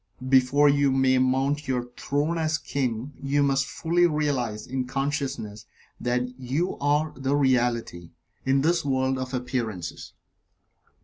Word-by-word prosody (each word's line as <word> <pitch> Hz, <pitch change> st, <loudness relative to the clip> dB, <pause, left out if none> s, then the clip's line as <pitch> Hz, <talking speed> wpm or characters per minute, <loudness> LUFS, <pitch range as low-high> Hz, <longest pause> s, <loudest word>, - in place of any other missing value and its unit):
Before 135 Hz, +2 st, +5 dB
you 140 Hz, 0 st, +4 dB
may 130 Hz, -1 st, +3 dB
mount 135 Hz, +3 st, +1 dB
your 125 Hz, -2 st, -2 dB
throne 150 Hz, +4 st, -1 dB
as 160 Hz, 0 st, +1 dB
King, 130 Hz, -2 st, -3 dB
you 140 Hz, +1 st, +1 dB
must 135 Hz, -1 st, +1 dB
fully 175 Hz, +1 st, +2 dB
realize 135 Hz, -9 st, -1 dB
in 130 Hz, 0 st, -3 dB
consciousness 135 Hz, -6 st, -3 dB, 0.3 s
that 125 Hz, 0 st, 0 dB
you 140 Hz, +8 st, -1 dB
are 150 Hz, +2 st, +1 dB
the 135 Hz, +1 st, 0 dB
Reality 120 Hz, -10 st, 0 dB, 0.3 s
in 135 Hz, +1 st, +2 dB
this 170 Hz, +3 st, +2 dB
world 130 Hz, -1 st, 0 dB
of 130 Hz, 0 st, -4 dB
appearances. 120 Hz, -8 st, -4 dB
135 Hz, 130 wpm, -26 LUFS, 125-145 Hz, 0.3 s, Before